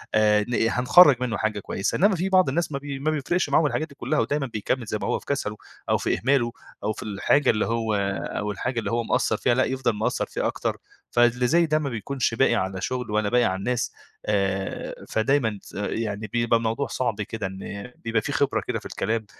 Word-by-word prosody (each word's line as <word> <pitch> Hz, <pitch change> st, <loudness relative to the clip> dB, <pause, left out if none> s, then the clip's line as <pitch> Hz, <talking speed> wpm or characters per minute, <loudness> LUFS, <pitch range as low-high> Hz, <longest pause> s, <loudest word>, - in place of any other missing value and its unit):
آآ 105 Hz, -1 st, +4 dB
ن 120 Hz, -, -1 dB, 0.2 s
هنخرّج 140 Hz, +4 st, +7 dB
منُّه 125 Hz, -3 st, -1 dB
حاجة 110 Hz, -1 st, -1 dB
كويسة، 95 Hz, 0 st, -2 dB
إنّما 200 Hz, +1 st, +4 dB
في 185 Hz, +2 st, -1 dB
بعض 185 Hz, -6 st, +4 dB
الناس 165 Hz, +4 st, -1 dB
ما 140 Hz, -, -2 dB
بي 140 Hz, -1 st, -6 dB
ما 155 Hz, +3 st, 0 dB
بيفرقش 155 Hz, +4 st, 0 dB
معاهم 155 Hz, -, +4 dB
الحاجات 155 Hz, +2 st, -1 dB
دي 140 Hz, -, -16 dB
كلّها، 140 Hz, +4 st, -1 dB
ودايمًا 145 Hz, -1 st, 0 dB
بيكمّل 115 Hz, +2 st, -2 dB
زي 105 Hz, -, -2 dB
ما -, -, -2 dB
هو -, -, 0 dB
في -, -, -19 dB
كسله 120 Hz, -7 st, -2 dB, 0.3 s
أو -, -, +4 dB
في -, -, 0 dB
إهماله، 120 Hz, +1 st, +2 dB, 0.3 s
أو 110 Hz, -, 0 dB
في -, -, -8 dB
الحاجة 110 Hz, +8 st, +2 dB
اللي 110 Hz, -, +2 dB
هو 115 Hz, -1 st, -1 dB, 0.4 s
أو 105 Hz, 0 st, -2 dB
الحاجة 120 Hz, +4 st, -2 dB
اللي 115 Hz, -, -3 dB
هو 115 Hz, 0 st, 0 dB
مقصّر 125 Hz, +3 st, +1 dB
فيها 120 Hz, -, +2 dB
لأ 130 Hz, -, +3 dB
يفضل 130 Hz, -4 st, -1 dB
مقصّر 110 Hz, -, -1 dB
فيها -, -, -2 dB
أكتر، -, -, -2 dB, 0.3 s
فاللي 120 Hz, +1 st, +3 dB
زي 170 Hz, +6 st, +4 dB
ده 155 Hz, -1 st, +1 dB
ما 145 Hz, -2 st, -2 dB
بيكونش 120 Hz, +2 st, -2 dB
باقي 120 Hz, 0 st, +3 dB
على 95 Hz, -2 st, -2 dB
شغل، 125 Hz, 0 st, -3 dB
ولا 105 Hz, -1 st, +1 dB
باقي 125 Hz, +1 st, +3 dB
على 95 Hz, -5 st, +1 dB
الناس 120 Hz, +5 st, -1 dB, 0.3 s
آآ 95 Hz, -2 st, -2 dB
فدايمًا 110 Hz, -1 st, +1 dB
تس -, -, -15 dB
يعني 105 Hz, +1 st, -3 dB
بيبقى 115 Hz, +2 st, +2 dB
الموضوع 115 Hz, +4 st, -1 dB
صعب 115 Hz, -5 st, -2 dB
كده 105 Hz, 0 st, -4 dB
إن 100 Hz, +4 st, -7 dB
بيبقى 115 Hz, -1 st, -1 dB
في -, -, -4 dB
خبرة -, -, +1 dB
كده -, -, -1 dB
في -, -, -19 dB
الكلام، 110 Hz, +1 st, -2 dB
120 Hz, 220 wpm, -25 LUFS, 105-135 Hz, 0.4 s, هنخرّج